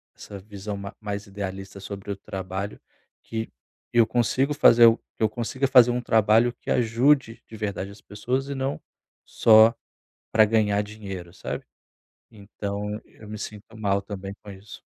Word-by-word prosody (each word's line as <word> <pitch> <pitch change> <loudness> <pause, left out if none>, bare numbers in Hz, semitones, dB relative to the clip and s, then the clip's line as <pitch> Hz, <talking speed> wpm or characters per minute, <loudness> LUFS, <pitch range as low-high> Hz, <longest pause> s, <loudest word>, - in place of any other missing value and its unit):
essa 100 - -10
visão 100 +1 -7
ma 100 0 -7
mais 100 -1 -5
idealista 95 0 -6
sobre 100 +1 -7
o - - -2
trabalho 95 +1 -6 0.4
que 115 0 -5 0.4
eu 115 -1 +6
consigo 130 +4 +1
fazer 120 -5 +7 0.3
que - - -2
eu 110 - +4
consiga 125 +4 -2
fazer 125 -2 +7
um 125 - -1
trabalho 115 +1 +3
que - - -9
ajude 120 +1 +2
de 110 - -11
verdade 100 -2 -3
as 100 - -15
pessoas 125 +7 -3
e 140 - -3
não 135 +1 -3 0.4
só 110 +1 +6 0.6
pra 110 -1 +6
ganhar 105 -2 +2
dinheiro, 100 -5 -8
sabe? - - -6 0.7
Então, 105 0 -5
eu 105 - -16
me 105 - -6
sinto 105 +2 -9
mal 100 -2 0
também 100 -1 -7
com 105 - -10
isso. 100 +1 -12
105 Hz, 155 wpm, -25 LUFS, 100-115 Hz, 0.7 s, fazer